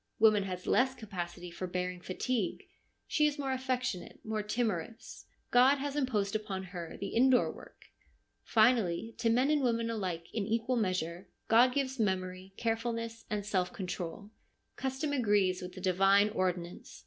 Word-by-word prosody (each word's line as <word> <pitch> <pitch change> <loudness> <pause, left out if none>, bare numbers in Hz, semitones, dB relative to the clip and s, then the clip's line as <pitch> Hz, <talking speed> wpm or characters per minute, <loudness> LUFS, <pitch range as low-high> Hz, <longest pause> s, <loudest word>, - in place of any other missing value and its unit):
Woman 215 -2 +5
has 180 -1 -5
less 260 +1 +3
capacity 180 -5 -6
for 185 +2 -5
bearing 180 0 -3
fatigue; 205 +3 -2 0.4
she 300 -1 +3
is 295 0 -2
more 275 -2 -2
affectionate, 255 -7 -2
more 215 -1 -1
timorous. 215 -2 -3 0.2
God 255 +3 +6
has 280 +1 -3
imposed 220 -8 0
upon 205 -3 -3
her 175 -3 -7
the 200 - -4
indoor 255 +1 +4
work. - - -14 0.6
Finally, 225 -2 +3
to 230 -1 +2
men 255 +5 +3
and 300 -1 +3
women 230 -2 +1
alike 185 -6 -3
in 215 -3 -1
equal 230 +3 0
measure, 185 -4 -2 0.2
God 245 +3 +6
gives 265 -2 -1
memory, 185 -2 -1
carefulness, 230 0 -2
and 210 -2 -2
self 185 -3 0
control. 185 +1 -5 0.4
Custom 270 +3 -2
agrees 205 -7 +2
with 180 0 -7
the 185 - -9
divine 195 +2 +4
ordinance. 180 -4 -3
215 Hz, 150 wpm, -32 LUFS, 185-245 Hz, 0.6 s, God